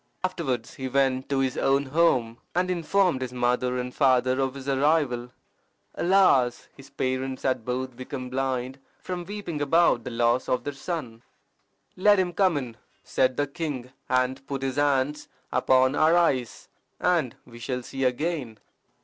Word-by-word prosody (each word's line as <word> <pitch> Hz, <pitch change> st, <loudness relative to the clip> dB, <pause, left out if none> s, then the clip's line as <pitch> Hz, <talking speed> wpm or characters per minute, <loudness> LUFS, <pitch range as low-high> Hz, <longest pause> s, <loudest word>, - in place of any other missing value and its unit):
Afterwards 155 Hz, -11 st, -2 dB
he 130 Hz, -, -5 dB
went 130 Hz, 0 st, +1 dB
to 140 Hz, -, 0 dB
his 130 Hz, -2 st, 0 dB
own 135 Hz, +1 st, +2 dB
home, 130 Hz, -6 st, +1 dB, 0.2 s
and 180 Hz, +1 st, +1 dB
informed 175 Hz, -3 st, +1 dB
his 130 Hz, -1 st, -3 dB
mother 125 Hz, 0 st, 0 dB
and 125 Hz, 0 st, -4 dB
father 130 Hz, -2 st, +3 dB
of 135 Hz, 0 st, -1 dB
his 135 Hz, 0 st, -8 dB
arrival. 135 Hz, -3 st, +1 dB, 0.6 s
Alas! 170 Hz, -10 st, +3 dB
his 135 Hz, 0 st, -14 dB
parents 130 Hz, 0 st, -3 dB
had 130 Hz, -3 st, 0 dB
both 125 Hz, +1 st, -3 dB
become 130 Hz, +1 st, -6 dB
blind 130 Hz, 0 st, -2 dB, 0.2 s
from 180 Hz, -1 st, -5 dB
weeping 200 Hz, -7 st, -5 dB
about 145 Hz, -4 st, +3 dB
the -, -, -5 dB
loss 120 Hz, +1 st, +1 dB
of 125 Hz, -, 0 dB
their 145 Hz, -, -4 dB
son. 135 Hz, -6 st, -5 dB, 0.7 s
"Let 205 Hz, +2 st, +5 dB
him 180 Hz, -2 st, 0 dB
come 185 Hz, -4 st, +2 dB
in," 120 Hz, -5 st, -5 dB, 0.3 s
said 130 Hz, -1 st, +1 dB
the 145 Hz, -, +2 dB
king, 140 Hz, -4 st, -5 dB, 0.2 s
"and 130 Hz, +1 st, +1 dB
put 135 Hz, -1 st, -4 dB
his 135 Hz, 0 st, -2 dB
hands 145 Hz, 0 st, +1 dB, 0.3 s
upon 130 Hz, 0 st, +3 dB
our 160 Hz, +3 st, +4 dB
eyes, 130 Hz, -9 st, 0 dB, 0.3 s
and 160 Hz, -9 st, +1 dB
we 120 Hz, -1 st, -13 dB
shall 125 Hz, +1 st, -3 dB
see 135 Hz, +2 st, -4 dB
again." 130 Hz, -2 st, -1 dB
135 Hz, 160 wpm, -26 LUFS, 125-155 Hz, 0.7 s, Let